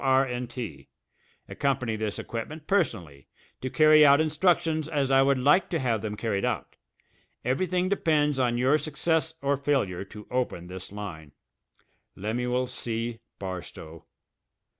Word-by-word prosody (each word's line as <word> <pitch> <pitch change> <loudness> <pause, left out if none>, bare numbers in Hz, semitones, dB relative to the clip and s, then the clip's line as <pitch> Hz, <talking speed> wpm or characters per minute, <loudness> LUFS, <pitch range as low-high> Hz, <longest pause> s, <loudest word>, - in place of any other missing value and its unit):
R. 135 0 +4
& 125 - -5
T. 110 - -7 0.6
Accompany 130 -5 -1
this 110 -1 -3
equipment 150 +7 -6
personally 85 - -1 0.3
to 130 - -3
carry 155 +1 +6
out 140 0 +7
instructions 160 0 +1
as 140 -4 0
I 135 0 +6
would 135 0 +3
like 145 +9 +3
to 170 - 0
have 120 -7 0
them 105 -1 -4
carried 105 -4 -1
out. - - -2 0.7
Everything 180 +8 +1
depends 150 -7 +1
on 120 -2 +1
your 130 +5 +3
success 160 +2 -1
or 140 0 +2
failure 130 -11 0
to 105 +2 -11
open 125 -9 -2
this 90 +1 -8
line. 85 -8 -8 0.8
LEMUEL 125 +5 -1
C. 115 -2 -4 0.2
BARSTOW. 85 -4 -7
130 Hz, 140 wpm, -27 LUFS, 105-150 Hz, 0.8 s, out